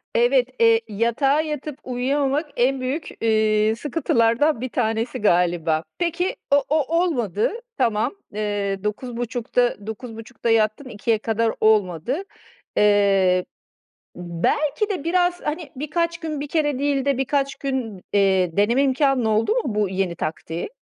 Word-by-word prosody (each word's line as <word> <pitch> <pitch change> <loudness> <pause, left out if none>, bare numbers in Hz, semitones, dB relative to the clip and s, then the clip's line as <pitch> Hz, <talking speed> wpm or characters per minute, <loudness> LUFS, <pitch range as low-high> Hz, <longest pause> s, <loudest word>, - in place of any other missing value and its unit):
Evet, 485 +1 +3
eee, 455 0 +5
yatağa 235 +8 +1
yatıp 300 -2 -5
uyuyamamak 275 +4 -1
en 260 +2 +1
büyük, 275 +5 -3
iii, 215 -1 +2
sıkıntılardan 240 -1 +1
1 255 - -3
tanesi 225 -1 -1
galiba. 170 -4 +2
Peki 350 +1 -1 0.2
o 285 -1 +5
o 315 +2 +1
olmadı 235 - 0 0.3
tamam. 225 - +1 0.2
Eee, 205 -2 -2
21.30'da, 240 0 -2
21.30'da 225 +1 -6
yattın 225 +4 +1
02.00'a 220 0 0
kadar 225 +1 0
olmadı. 215 - +2 0.5
Eee, 195 -3 +4 0.7
ımm, 170 -1 -7
belki 305 +8 +1
de 370 -8 -3
biraz, 355 +1 +1
hani, 300 -1 -4
birkaç 335 +5 -1
gün 310 -3 -4
1 295 - -4
kere 295 -3 0
değil 280 -1 0
de 280 -2 +1
birkaç 275 +1 0
gün, 250 -9 -4
eee, 190 -3 +2
deneme 235 +7 +3
imkânın 270 -2 +2
oldu 220 - +2
mu, - - +1
bu 210 -2 +1
yeni 185 -2 -1
taktiği? 165 - -4
245 Hz, 130 wpm, -22 LUFS, 210-290 Hz, 0.7 s, eee